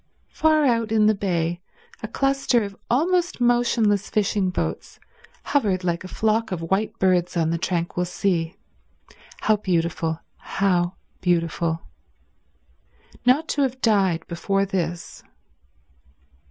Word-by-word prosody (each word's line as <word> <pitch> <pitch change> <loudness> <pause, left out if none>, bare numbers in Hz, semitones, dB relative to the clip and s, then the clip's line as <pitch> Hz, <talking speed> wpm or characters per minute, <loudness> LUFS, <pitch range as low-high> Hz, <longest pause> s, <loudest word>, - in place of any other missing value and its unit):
Far 310 -1 +3
out 230 -3 +1
in 215 -1 +4
the 215 - +5
bay 175 -4 -1 0.4
a - - -4
cluster 275 -4 +1
of 200 -1 -6
almost 345 +6 +1
motionless 235 -4 +2
fishing 200 -2 +1
boats 180 - -4 0.4
hovered 200 -10 +1
like 170 -1 -1
a - - -7
flock 220 +3 0
of 165 -2 -4
white 205 +3 0
birds 180 -2 +1
on 165 -1 +1
the 170 - -1
tranquil 175 0 -1
sea. 175 -2 -1 0.9
How 215 -1 +3
beautiful, 170 -4 -1 0.2
how 180 -2 0 0.3
beautiful. 170 -2 0 1.4
Not 290 +6 +4
to 290 - 0
have 260 -1 0
died 195 -8 +2
before 195 +3 0
this 175 -3 -4
195 Hz, 120 wpm, -23 LUFS, 175-230 Hz, 1.4 s, the